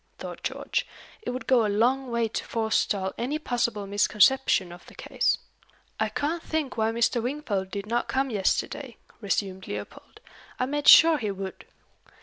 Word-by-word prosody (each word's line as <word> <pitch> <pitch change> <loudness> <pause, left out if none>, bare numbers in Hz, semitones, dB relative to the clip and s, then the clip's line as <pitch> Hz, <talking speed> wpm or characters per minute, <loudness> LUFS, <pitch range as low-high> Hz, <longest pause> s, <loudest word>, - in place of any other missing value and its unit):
thought - - -8
George. - - -2 0.3
"It - - -5
would 255 +1 -4
go 250 -3 +4
a 210 - 0
long 250 +6 +1
way 235 -1 0
to 220 - -4
forestall 215 -4 0
any 260 +6 -1
possible 235 -7 -1
misconception 205 0 +3
of 175 0 -12
the - - -15
case." - - 0 0.6
"I - - +1
can't 320 +4 -2
think 315 -5 -3
why 220 0 +1
Mr. 235 +1 +1
Wingfold 235 -7 -3
did 200 +1 -5
not 235 +3 -1
come 265 0 0
yesterday," 230 +5 -1 0.2
resumed 195 -3 -2
Leopold. - - -8 0.4
"I 255 - +1
made 290 +2 -3
sure 325 -2 +9
he 215 -4 -2
would." 195 -1 -6
235 Hz, 160 wpm, -26 LUFS, 205-265 Hz, 0.6 s, sure